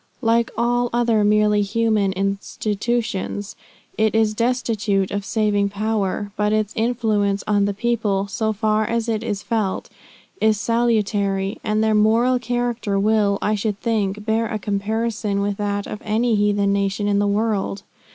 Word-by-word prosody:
Like 230 0 +2
all 240 +1 +1
other 235 -3 +2
merely 210 0 +3
human 210 -1 +1
institutions, 205 +1 -2 0.4
it 220 0 +2
is 220 -1 +3
destitute 220 -4 0
of 205 0 -2
saving 205 -1 +1
power; 205 -1 -2
but 210 0 +1
its 215 -1 0
influence 220 -4 0
on 205 -1 +2
the 200 - -1
people, 210 -4 0
so 220 +2 -1
far 215 0 +1
as 230 +1 -1
it 225 -1 -1
is 205 -3 -3
felt, 215 -5 -2 0.5
is 215 -1 +3
salutary, 210 -4 0
and 215 0 +1
their 220 0 +2
moral 230 +4 +3
character 240 -4 -1
will, 205 -1 +2
I 210 - +1
should 210 -1 -2
think, 210 -3 -1
bear 225 +1 +1
a 220 -1 -3
comparison 210 +1 -2
with 200 0 -1
that 205 -1 -2
of 210 - -7
any 225 +2 +1
heathen 205 -1 +2
nation 200 +1 0
in 200 -1 +2
the 205 - +2
world. 205 -2 -1
210 Hz, 150 wpm, -21 LUFS, 200-225 Hz, 0.5 s, merely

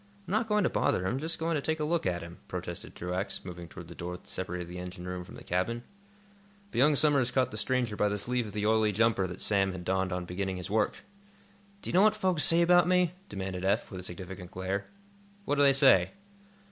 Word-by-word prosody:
"I'm - - -6
not 220 +3 +1
going 210 -2 +2
to - - +3
bother 90 - +1
him; 110 +8 0
just 160 +3 0
going 165 +1 -1
to 150 - 0
take 160 +2 -1
a - - 0
look 160 - 0
at 85 -2 -1
him," 85 +1 -10
protested - - -6
Truax, 90 +3 -3
moving 85 -2 -7
toward 85 0 -10
the 85 - -9
door 90 +1 -5
that - - -22
separated 90 -1 -4
the 90 +1 -7
engine 90 0 -7
room 90 0 -4
from - - -12
the - - -11
cabin. 115 +7 -1 0.9
But - - -1
young 145 +3 +5
Somers 140 -4 +3
caught 130 -1 +1
the 105 - -5
stranger 120 -1 0
by 105 0 +2
the 105 - -1
sleeve 120 +2 -1
of 105 - -9
the 105 0 -1
oily 110 -1 +3
jumper 110 -3 +2
that 90 0 -8
Sam 95 -2 +2
had 90 -1 -7
donned 95 0 0
on 90 0 -2
beginning 95 +1 -3
his 90 +2 -6
work. 105 -1 0 0.8
"Do - - -3
you - - -8
know 185 - +6
what 215 +1 +5
folks 185 -7 +1
say 170 +1 +5
about 175 0 +5
me?" 180 -1 +3 0.2
demanded 95 -2 -4
Eph, 100 +5 +1
with 95 - -6
a - - -8
significant 90 0 -7
glare. 95 +2 -3 0.6
"What 145 - 0
do - - +4
they 140 -1 +7
say?" 135 +5 +5
105 Hz, 240 wpm, -30 LUFS, 90-145 Hz, 0.9 s, they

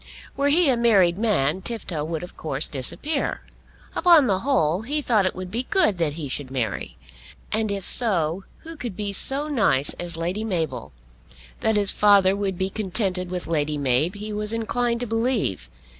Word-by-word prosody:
Were 280 +1 0
he 320 +3 +4
a 260 -3 +2
married 195 -7 +3
man, 190 -7 +1
Tifto 190 -8 -4
would 160 +1 -4
of 180 - -10
course 150 -1 -2
disappear. 275 - -2 0.5
Upon 340 -6 +5
the 195 -6 +1
whole 190 - +1
he 285 +7 -2
thought 220 -9 +1
it - - -3
would 185 -1 -7
be 240 +4 -3
good 375 - +2
that 155 -3 0
he 155 -2 -6
should 130 0 -5
marry. 125 -6 -4 0.5
And, 220 0 0
if 200 -1 -3
so, 185 -7 +4 0.2
who 330 0 -10
could 240 - -6
be 205 0 -4
so 275 +9 +3
nice 200 - +1
as 175 -2 -4
Lady 175 +6 -3
Mabel? 165 - -3 0.7
That 220 - +1
his 205 -2 +2
father 200 -2 +4
would 195 -2 -3
be 190 +1 -2
contented 190 -3 -1
with 180 -1 -3
Lady 150 -2 -1
Mab, 140 +6 +1
he 210 +1 -6
was 210 0 -2
inclined 235 +1 -1
to - - -1
believe. 225 - -1
195 Hz, 180 wpm, -23 LUFS, 165-230 Hz, 0.7 s, Upon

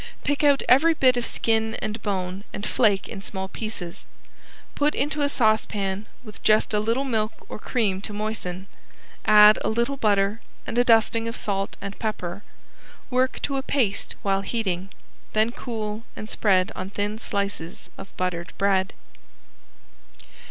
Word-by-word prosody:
Pick 290 +1 0
out 285 -1 +4
every 320 +6 +5
bit 255 -4 +4
of 245 -1 -1
skin 220 -1 0
and 215 0 -4
bone, 190 -1 -3
and 205 - -4
flake 205 -5 +2
in 200 - -7
small 190 -1 -5
pieces. 195 -5 -5 0.7
Put 295 +1 +1
into 295 +2 -1
a 285 - +2
saucepan 215 -5 0 0.2
with 215 -4 -12
just 215 0 +3
a 210 - +3
little 230 +5 0
milk 220 -5 -2
or - - -7
cream 205 -5 0
to 205 - -6
moisten, 205 -3 -4 0.6
add 210 0 +8
a - - +1
little 235 +5 0
butter 205 -1 +2 0.2
and - - -4
a - - +6
dusting 230 -1 +3
of 230 - -4
salt 195 -1 -2
and 200 0 -6
pepper. 200 -4 -3 0.7
Work 255 +1 +1
to 275 - 0
a - - 0
paste 240 -7 -1
while 195 -1 +1
heating, 195 -3 -2 0.4
then 220 +2 +3
cool 220 -3 -5
and 215 - -7
spread 195 -2 +2
on 185 - -5
thin 205 +2 -3
slices 200 -5 -3
of 195 - -12
buttered 180 -1 -2
bread. 195 -1 +2
215 Hz, 155 wpm, -24 LUFS, 195-230 Hz, 0.7 s, add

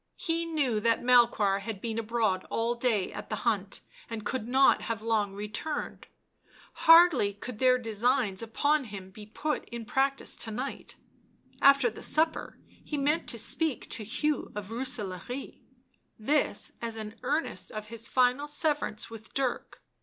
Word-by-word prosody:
He 335 -1 -1
knew 280 -9 0
that 230 +2 +1
Melchoir 235 -5 +4
had 200 0 -6
been 225 +1 -3
abroad 220 -4 0
all 230 +1 0
day 235 -5 0
at - - -8
the - - -1
hunt 205 -4 0 0.3
and 225 -2 -6
could 250 -2 -2
not 265 +2 +4
have 225 -2 -4
long 215 -3 0
returned, 210 +9 -5 0.7
hardly 330 - +6
could 220 +2 -8
their 255 -1 +5
designs 225 -3 0
upon 285 +6 +1
him 195 -3 -9
be 210 +1 -11
put 300 +8 -3
in 235 -1 -6
practice 270 +3 0
to 225 - +1
night; 250 +6 -5 0.7
after 275 -4 +6
the - - -10
supper 315 +1 +1 0.3
he 300 - -4
meant 295 +4 +1
to - - -2
speak 320 -6 0
to 220 - -2
Hugh 300 +8 -1
of 210 -1 -5
Booselaare, 240 -1 -4 0.6
this 290 +7 +1
as 230 -1 -4
an 220 0 -7
earnest 280 - -2
of 215 0 -7
his 230 0 -2
final 255 +3 +2
severance 295 -8 -1
with 220 -1 -11
Dirk. 265 -3 -2
235 Hz, 155 wpm, -29 LUFS, 215-275 Hz, 0.7 s, hardly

